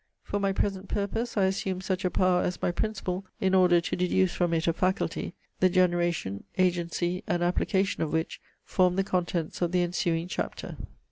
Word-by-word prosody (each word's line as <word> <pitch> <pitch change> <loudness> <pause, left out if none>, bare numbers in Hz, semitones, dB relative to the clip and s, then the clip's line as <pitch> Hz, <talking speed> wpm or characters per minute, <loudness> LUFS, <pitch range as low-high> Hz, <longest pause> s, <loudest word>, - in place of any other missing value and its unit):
For 205 - -2
my 195 -1 +1
present 195 0 -2
purpose, 225 +3 -2
I 200 - +4
assume 190 -1 0
such 185 0 -2
a 185 - +2
power 180 -1 +2
as 180 - -2
my - - 0
principle, 195 -1 -2 0.2
in 190 -1 +1
order 180 -2 +6
to - - -2
deduce 180 0 +2
from 175 -2 0
it 165 -1 +1
a 165 - +3
faculty, 185 -1 -1 0.2
the 185 - +5
generation, 175 - +1
agency, 175 0 0
and 175 -4 0
application 190 +2 +1
of 155 -2 -1
which 160 +1 -2 0.2
form 180 -1 +2
the 195 - +2
contents 175 -4 -2
of 175 -1 +1
the 180 -1 +2
ensuing 170 -1 0
chapter. - - -4
180 Hz, 185 wpm, -28 LUFS, 175-190 Hz, 0.2 s, order